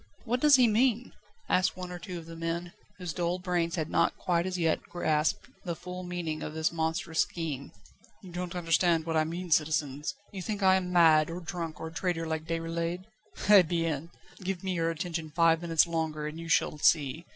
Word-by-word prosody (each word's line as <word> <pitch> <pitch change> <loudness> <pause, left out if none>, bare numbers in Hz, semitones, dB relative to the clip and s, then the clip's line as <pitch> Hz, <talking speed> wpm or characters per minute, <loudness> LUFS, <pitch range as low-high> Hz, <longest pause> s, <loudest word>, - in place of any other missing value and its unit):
"What 245 +2 0
does 295 +1 +7
he 250 -2 +6
mean?" 235 +2 +2 0.4
asked 185 0 +2
one 180 -1 -6
or 175 - -6
two 180 0 -6
of 165 - -8
the 165 0 -9
men, 165 +2 -3 0.2
whose 180 -4 -5
dull 175 0 -1
brains 175 -2 -1
had 160 -3 -2
not - - +1
quite 175 0 0
as 185 -1 -2
yet 165 -2 +1
grasped 155 -3 0 0.2
the 170 -2 -3
full 180 +2 -7
meaning 175 -3 -4
of 155 - -5
this 160 0 +1
monstrous 160 +1 -2
scheme. 150 -5 -2 0.5
"You 185 - -10
don't 180 0 -5
understand 165 -1 +2
what 165 -1 -2
I 155 0 +3
mean, 170 +2 -5
citizens; 150 -2 +1 0.2
you 195 - -6
think 205 +1 -3
I 190 0 +6
am 185 -1 0
mad, 160 -3 +5
or 170 +2 -5
drunk, 170 -2 -5
or 160 - -5
a - - -15
traitor 165 -1 -1
like 160 -1 -3
Déroulède? 165 +2 -2 0.4
Eh 205 -2 +9
bien! 165 -2 -1 0.3
give 185 -1 -3
me 190 -1 -1
your 165 -1 0
attention 165 -1 -3
five 165 +1 +3
minutes 165 -2 +3
longer, 160 -2 -2
and 150 +2 -5
you 165 0 -7
shall 155 -1 +2
see. 150 +1 +2
170 Hz, 205 wpm, -29 LUFS, 160-180 Hz, 0.5 s, Eh